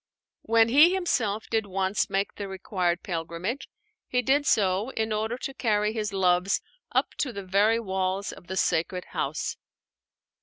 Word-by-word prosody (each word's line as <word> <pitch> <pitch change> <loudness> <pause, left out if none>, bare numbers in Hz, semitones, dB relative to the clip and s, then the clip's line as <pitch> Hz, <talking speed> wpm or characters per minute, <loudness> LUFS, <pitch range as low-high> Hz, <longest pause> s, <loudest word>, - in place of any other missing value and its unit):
When 225 0 +4
he 310 +9 +6
himself 225 - 0
did 220 -2 0
once 190 +1 0
make 195 +1 -1
the 200 - -6
required 185 -2 -1
pilgrimage, 170 - -4 0.4
he 250 0 0
did 285 +4 +2
so 195 +2 +2
in 220 -4 -2
order 220 +3 -1
to 270 - -5
carry 210 -4 +1
his 215 -2 -2
loves 185 0 +2 0.3
up - - +1
to 265 - 0
the 200 -4 -7
very 205 +5 +3
walls 190 -1 -2
of 175 - -13
the 190 0 -4
sacred 180 +1 0
house. - - -2
205 Hz, 155 wpm, -27 LUFS, 190-230 Hz, 0.4 s, he